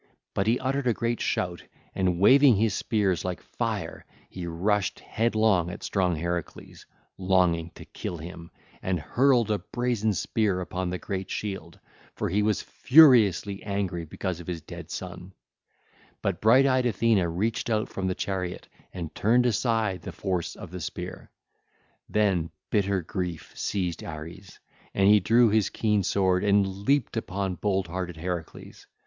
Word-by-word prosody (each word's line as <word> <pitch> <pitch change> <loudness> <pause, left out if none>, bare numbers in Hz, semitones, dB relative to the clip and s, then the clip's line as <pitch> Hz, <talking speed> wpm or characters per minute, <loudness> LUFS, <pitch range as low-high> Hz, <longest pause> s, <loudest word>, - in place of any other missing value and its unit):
But 100 - 0
he 115 +2 +3
uttered 135 0 -1
a 120 - +2
great 115 -1 -1
shout 90 -2 -1 0.3
and 90 -2 0
waving 135 +5 +7
his 110 0 +1
spears 100 -6 0
like 90 -1 -3
fire, - - -4 0.3
he 90 -2 -6
rushed 95 +4 0
headlong 110 -6 +1
at 90 - -8
strong 90 -3 +1
Heracles, 85 +1 -5 0.3
longing 90 -3 +2
to - - -11
kill 85 - -6
him, 85 +1 -9 0.3
and 95 -2 -1
hurled 120 - +2
a 105 - +1
brazen 110 +2 -1
spear 100 -1 0
upon 90 0 -3
the 90 - -2
great 95 0 -5
shield, 95 -6 -5 0.4
for - - -2
he 100 +4 +1
was 105 -1 +1
furiously 115 - +5
angry 100 -4 -2
because 90 +2 -4
of 85 - -10
his 90 -2 -3
dead 85 0 -9
son; 90 0 -7 0.9
but 95 -4 -1
bright 125 +5 +6
eyed 130 -2 +3
Athene 115 -1 +2
reached 105 +8 -1
out 110 -1 +1
from 95 -1 -3
the 90 - -1
car 95 -2 -2 0.4
and 85 -4 -6
turned 120 +8 +3
aside 110 -5 +1
the - - -7
force 90 -4 -3
of - - -10
the 90 -1 -6
spear. 80 - -6 0.8
Then 95 -6 +1 0.2
bitter 100 -3 +1
grief 90 -1 -4
seized 90 -4 -2
Ares 85 +5 -9 0.4
and 95 0 +4
he 105 +1 +7
drew 115 +5 +4
his 105 -1 +2
keen 105 -2 +1
sword 95 0 +1
and 100 -1 +4 0.2
leaped 140 -4 +2
upon 100 -3 -2
bold 95 +1 0
hearted 90 0 -5
Heracles. 85 0 -6
95 Hz, 155 wpm, -27 LUFS, 90-110 Hz, 0.9 s, waving